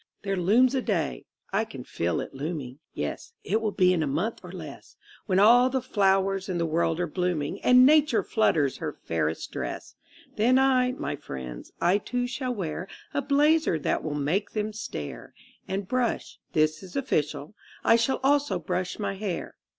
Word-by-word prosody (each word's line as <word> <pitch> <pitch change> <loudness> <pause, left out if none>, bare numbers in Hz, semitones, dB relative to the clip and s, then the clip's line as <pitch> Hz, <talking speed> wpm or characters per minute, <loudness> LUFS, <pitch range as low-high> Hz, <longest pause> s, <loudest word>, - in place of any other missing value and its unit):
There 195 -1 -1
looms 220 +9 +4
a 265 - +1
Day 170 - -2 0.3
(I - - +2
can - - -9
feel 85 +1 -2
it - - -8
looming; 140 -2 -5
Yes, 460 - -5
it 220 +3 0
will 220 - 0
be 185 -2 +4
in 170 - 0
a 155 - 0
month 170 +12 -1
or 180 - -10
less), 150 - -10 0.3
When 185 - +2
all 240 +5 +6
the 265 0 0
flowers 195 -5 +1
in 180 - -1
the 170 - 0
world 165 +1 0
are 180 - +1
blooming 175 -3 -2
And 250 0 +7
Nature 300 -3 +4
flutters 155 - +1
her - - -4
fairest 80 -1 -2
dress - - -5 0.4
Then 245 +4 +4
I, 255 -1 +3
my 255 - -3
friends, 65 - -8
I 180 +4 +3
too 245 +3 -2
shall 250 0 -3
wear 180 -2 -4 0.3
A 285 - 0
blazer 290 - +3
that 150 - -1
will 150 -1 -3
make 155 +8 0
them 215 0 -2
stare, 75 - -7 0.3
And 195 0 -3
brush 250 +1 -1
this 155 0 +2
is 185 -2 -12
official: 155 - -1 0.3
I - - +6
shall 235 +3 +1
also 285 +1 +2
brush 180 -1 -3
my 200 -2 -2
hair. 195 -3 -4
195 Hz, 180 wpm, -27 LUFS, 155-245 Hz, 0.4 s, And